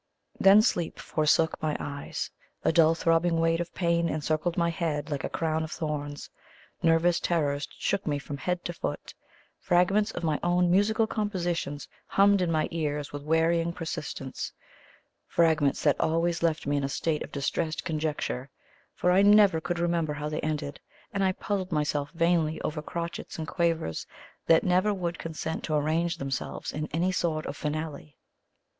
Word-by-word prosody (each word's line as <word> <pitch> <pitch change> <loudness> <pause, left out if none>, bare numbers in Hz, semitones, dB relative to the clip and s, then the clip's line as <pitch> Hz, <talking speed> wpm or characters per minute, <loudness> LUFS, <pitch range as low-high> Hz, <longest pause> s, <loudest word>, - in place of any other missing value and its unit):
Then 200 +2 +7
sleep 170 -6 0
forsook 155 +1 +1
my 155 -1 0
eyes; 140 0 -5 0.3
a - - +5
dull 165 -1 +5
throbbing 165 0 +2
weight 165 0 +2
of 170 - -5
pain 170 -1 +1
encircled 155 +2 -1
my 170 -1 +2
head 155 -3 -2
like 145 - -2
a - - -2
crown 160 -1 -1
of 160 - -5
thorns; 145 -2 -4 0.5
nervous 165 +1 +3
terrors 145 -4 0
shook 200 -3 -1
me 145 -1 +1
from 145 0 -6
head 180 +4 -2
to 175 - -3
foot; - - -5 0.5
fragments 195 +4 +3
of 175 -5 -6
my 155 -2 +1
own 175 0 +2
musical 215 +4 +3
compositions 175 -9 -2 0.2
hummed 200 0 +4
in 175 -2 +1
my 155 -1 +1
ears 150 -3 -2
with 145 - -5
wearying 165 +2 +2
persistence 150 -5 -5 0.8
fragments 155 -4 +2
that 145 -3 +3
always 165 +1 +1
left 160 -2 0
me 145 0 +1
in 140 - -1
a 135 - -1
state 155 +2 -1
of - - -6
distressed 155 +3 -2
conjecture; 155 -5 -2 0.5
for 180 - +2
I 185 +2 +5
never 205 -5 +6
could 175 +1 -2
remember 170 -3 0
how 150 +1 -4
they 155 - -3
ended, 150 -2 -3 0.3
and 195 -1 0
I 190 - +3
puzzled 190 -1 -3
myself 150 -2 0
vainly 165 -2 +2
over 150 0 -3
crotchets 170 +2 -5
and 160 -1 -4
quavers 165 - -1 0.4
that 165 - +5
never 185 +3 +2
would 175 -3 -3
consent 160 0 -4
to 155 - -1
arrange 160 +3 +1
themselves 135 -1 -4
in 150 +1 -3
any 175 +4 0
sort 165 -4 -1
of - - -5
finale. 150 - -5
165 Hz, 165 wpm, -28 LUFS, 150-175 Hz, 0.8 s, Then